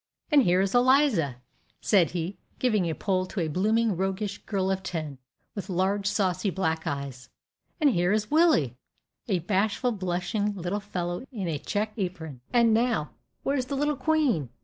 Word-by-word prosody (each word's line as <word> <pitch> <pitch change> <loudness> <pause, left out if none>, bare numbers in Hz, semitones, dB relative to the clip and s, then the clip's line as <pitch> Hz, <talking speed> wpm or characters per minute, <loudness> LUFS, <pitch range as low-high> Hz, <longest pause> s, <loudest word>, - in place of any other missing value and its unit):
And 295 -2 +7
here 180 -5 +3
is 195 0 0
Eliza," 245 - +4 0.4
said 190 -6 +3
he, 175 +2 -4 0.2
giving 215 -9 +1
a 160 - -2
pull 185 -2 0
to 195 - -5
a 165 - 0
blooming, 215 +6 +1
roguish 195 +3 -2
girl 195 -2 0
of 190 0 -1
ten, 155 -7 -5 0.3
with 200 -2 -6
large, 195 +2 0
saucy 195 -1 +1
black 160 -4 -1
eyes. 140 -3 -5 0.5
"And 295 -3 +4
here 175 -3 +2
is 215 +2 0
Willie!" 300 - +4 0.5
a 195 -5 +2
bashful, 205 +7 0
blushing 195 +1 -1
little 185 +2 -2
fellow 180 -2 -4
in 205 -8 -4
a 155 -3 -2
checked 215 +5 -3
apron. 160 -8 -4
"And 235 -2 +4
now, 225 - +1 0.3
where's 270 -2 0
the 280 - -3
little 295 +2 +1
queen? 260 - +1
195 Hz, 165 wpm, -27 LUFS, 175-225 Hz, 0.5 s, And